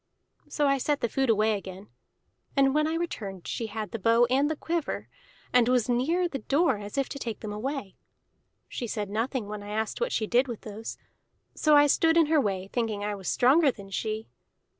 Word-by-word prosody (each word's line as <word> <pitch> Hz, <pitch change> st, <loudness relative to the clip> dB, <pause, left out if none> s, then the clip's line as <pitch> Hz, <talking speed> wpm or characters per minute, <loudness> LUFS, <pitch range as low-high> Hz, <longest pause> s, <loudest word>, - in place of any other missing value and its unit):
So 295 Hz, -, 0 dB
I 275 Hz, -1 st, +3 dB
set 290 Hz, +2 st, 0 dB
the -, -, +2 dB
food 270 Hz, +3 st, 0 dB
away 215 Hz, 0 st, +3 dB
again; 195 Hz, 0 st, -8 dB, 0.7 s
and 270 Hz, -1 st, +4 dB
when 305 Hz, +1 st, +2 dB
I 320 Hz, -, -1 dB
returned 205 Hz, -, -4 dB
she 230 Hz, -, -3 dB
had 215 Hz, -2 st, -5 dB
the 230 Hz, -, -4 dB
bow 230 Hz, +4 st, +4 dB
and 275 Hz, +3 st, +3 dB
the 315 Hz, -, -1 dB
quiver, 330 Hz, +1 st, -3 dB, 0.5 s
and 245 Hz, -1 st, +5 dB
was 250 Hz, -3 st, +2 dB
near 305 Hz, +9 st, +1 dB
the 275 Hz, -5 st, -5 dB
door 275 Hz, 0 st, +2 dB
as 205 Hz, +4 st, -8 dB
if 275 Hz, -, +1 dB
to 280 Hz, -, -6 dB
take 230 Hz, -5 st, -5 dB
them 210 Hz, -2 st, -5 dB
away. 230 Hz, -2 st, -4 dB, 0.7 s
She 240 Hz, -, -5 dB
said 210 Hz, -2 st, -3 dB
nothing 230 Hz, +1 st, -2 dB
when 210 Hz, 0 st, -6 dB
I 205 Hz, -, -9 dB
asked 220 Hz, -, -2 dB
what 485 Hz, -, 0 dB
she 220 Hz, -, 0 dB
did 245 Hz, +4 st, +2 dB
with 235 Hz, -3 st, -6 dB
those; 220 Hz, +1 st, -7 dB, 0.6 s
so 305 Hz, -1 st, +4 dB
I 290 Hz, 0 st, +7 dB
stood 325 Hz, +3 st, +3 dB
in 330 Hz, -, +6 dB
her 305 Hz, -1 st, +3 dB
way, 195 Hz, -4 st, -2 dB
thinking 220 Hz, -4 st, -1 dB
I 210 Hz, 0 st, -1 dB
was 195 Hz, -2 st, -5 dB
stronger 280 Hz, +5 st, +4 dB
than 200 Hz, -6 st, -7 dB
she. 215 Hz, +2 st, -3 dB
240 Hz, 210 wpm, -27 LUFS, 210-285 Hz, 0.7 s, I